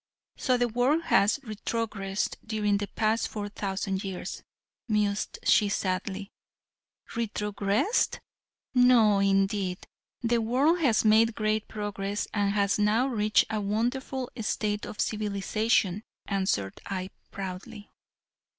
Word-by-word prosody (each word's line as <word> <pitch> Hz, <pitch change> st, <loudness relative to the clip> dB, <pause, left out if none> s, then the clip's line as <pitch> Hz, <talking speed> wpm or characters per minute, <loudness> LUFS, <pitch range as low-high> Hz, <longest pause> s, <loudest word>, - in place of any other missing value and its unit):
"So 255 Hz, -2 st, +1 dB
the 245 Hz, 0 st, +2 dB
world 250 Hz, +8 st, +1 dB
has 200 Hz, -6 st, +3 dB
retrogressed 215 Hz, -3 st, -3 dB
during 210 Hz, -2 st, 0 dB
the 205 Hz, 0 st, -3 dB
past 220 Hz, +2 st, 0 dB
four 205 Hz, -1 st, -5 dB
thousand 195 Hz, -1 st, -3 dB
years," 190 Hz, -2 st, -5 dB, 0.5 s
mused 210 Hz, -2 st, 0 dB
she 210 Hz, -, +4 dB
sadly. 195 Hz, +1 st, -2 dB, 0.8 s
"Retrogressed! 210 Hz, -, 0 dB, 0.6 s
No 245 Hz, -5 st, +5 dB
indeed, 195 Hz, -1 st, +1 dB, 0.4 s
the 235 Hz, 0 st, +2 dB
world 270 Hz, +10 st, +2 dB
has 245 Hz, -9 st, +3 dB
made 220 Hz, +1 st, +5 dB
great 215 Hz, 0 st, 0 dB
progress 205 Hz, -1 st, -3 dB
and 205 Hz, -1 st, +1 dB
has 200 Hz, 0 st, +1 dB
now 215 Hz, +4 st, +3 dB
reached 215 Hz, -3 st, +3 dB
a 215 Hz, -1 st, -1 dB
wonderful 245 Hz, +5 st, -2 dB
state 210 Hz, -1 st, -1 dB
of -, -, -9 dB
civilization," 210 Hz, -1 st, 0 dB, 0.3 s
answered 190 Hz, -, -1 dB
I, 190 Hz, -1 st, -4 dB, 0.2 s
proudly. 195 Hz, +2 st, -7 dB
210 Hz, 115 wpm, -28 LUFS, 200-225 Hz, 0.8 s, No